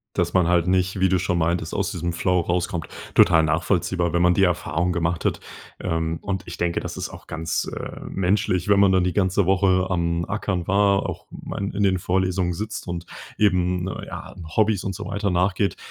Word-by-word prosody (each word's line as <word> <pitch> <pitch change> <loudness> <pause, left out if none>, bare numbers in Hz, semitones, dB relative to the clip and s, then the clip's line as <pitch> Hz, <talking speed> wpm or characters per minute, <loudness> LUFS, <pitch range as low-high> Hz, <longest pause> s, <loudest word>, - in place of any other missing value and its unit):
Dass - - 0
man 90 -2 +3
halt 90 -1 +3
nicht, 95 +1 +1
wie 95 - +4
du 95 0 +2
schon 90 0 0
meintest, 85 0 0
aus 100 -1 -1
diesem 85 -2 -2
Flow 90 +1 +1
rauskommt, 85 -1 -2 0.3
total 80 -2 +6
nachvollziehbar, 85 +2 0
wenn 85 - +1
man 90 0 +5
die 95 - +3
Erfahrung 90 -1 +1
gemacht 85 -1 -1
hat. - - 0 0.4
Ähm, 80 0 -2
und 95 -2 -3
ich 85 - -7
denke, 85 -1 0
das - - -6
ist - - -4
auch - - -12
ganz, 80 +1 -2
äh, - - -7
menschlich, 95 -1 0
wenn 100 -1 +5
man 100 -1 +5
dann 95 -1 +3
die 90 - 0
ganze 95 +1 +2
Woche 95 0 +3
am 85 -2 0
Ackern 95 -3 -2
war, 100 0 +3
auch - - -7
man 100 0 -5
in 100 +1 -1
den 95 -1 +3
Vorlesungen 90 0 0
sitzt 105 +6 -5
und 85 0 -4 0.3
eben 90 -3 +2
ne, 95 - -5
ja, - - -8 0.2
Hobbys 110 -3 +3
und 95 - -3
so - - -7
weiter 100 0 -1
nachgeht, 95 +2 +1
90 Hz, 205 wpm, -23 LUFS, 85-95 Hz, 0.4 s, total